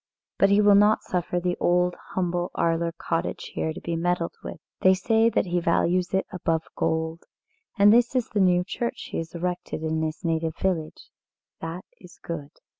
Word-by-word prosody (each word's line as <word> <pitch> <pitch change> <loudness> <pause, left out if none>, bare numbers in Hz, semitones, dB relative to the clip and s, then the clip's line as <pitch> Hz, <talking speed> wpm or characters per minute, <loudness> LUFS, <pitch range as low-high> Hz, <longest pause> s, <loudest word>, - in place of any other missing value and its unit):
But 195 - +5
he 200 +1 +5
will 205 -1 +6
not 210 +2 +5
suffer 180 0 -1
the 180 0 -1
old, 180 0 +2 0.2
humble 175 -1 -1
Arler 170 0 +1
cottage 165 - -3
here 160 - -1
to - - -7
be 170 - -3
meddled 170 0 -1
with. - - -7 0.2
They 185 0 +5
say 225 +4 +3
that - - +1
he 175 -1 0
values 175 +1 +1
it 190 0 +1
above 165 -3 -1
gold. 160 +1 -1 0.5
And 205 +1 +7
this 240 +2 +3
is 250 -3 0
the 210 - -1
new 180 -2 +4
church 235 +5 -4
he - - -3
has 165 +1 -7
erected 175 -2 -3
in 160 0 -1
his 160 +3 -4
native 160 -1 -1
village 170 -5 -3 0.5
that 165 +3 -6
is 180 -1 -15
good." 150 -4 -6
175 Hz, 185 wpm, -25 LUFS, 165-190 Hz, 0.5 s, And